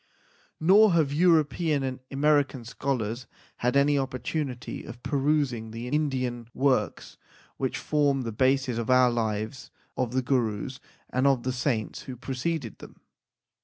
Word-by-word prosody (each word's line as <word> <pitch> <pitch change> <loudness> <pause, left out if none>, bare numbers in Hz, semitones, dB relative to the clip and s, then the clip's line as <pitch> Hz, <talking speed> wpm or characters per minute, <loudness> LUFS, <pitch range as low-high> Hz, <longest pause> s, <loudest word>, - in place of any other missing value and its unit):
Nor 195 +5 +6
have 155 -4 +2
European 155 -2 +3
and 130 -1 -3
American 140 -3 +1
scholars 125 -1 -3 0.3
had 125 +2 0
an 140 +1 +4
opportunity 130 0 -4
of 120 - -10
perusing 140 -5 0
the 115 +2 -6
Indian 130 -5 -1
works 135 -1 0 0.4
which 130 -1 -2
form 145 -3 +1
the 115 - -3
basis 130 +1 +1
of 115 - -4
our 125 -1 +5
lives 110 +1 -3 0.3
of 125 -2 -2
the 130 0 +1
Gurus 120 -1 -1 0.3
and 130 +2 +2
of 135 -4 +2
the 130 - -1
saints 125 -4 -2
who 130 - -5
preceded 130 - -4
them. - - -13
130 Hz, 135 wpm, -27 LUFS, 120-145 Hz, 0.4 s, Nor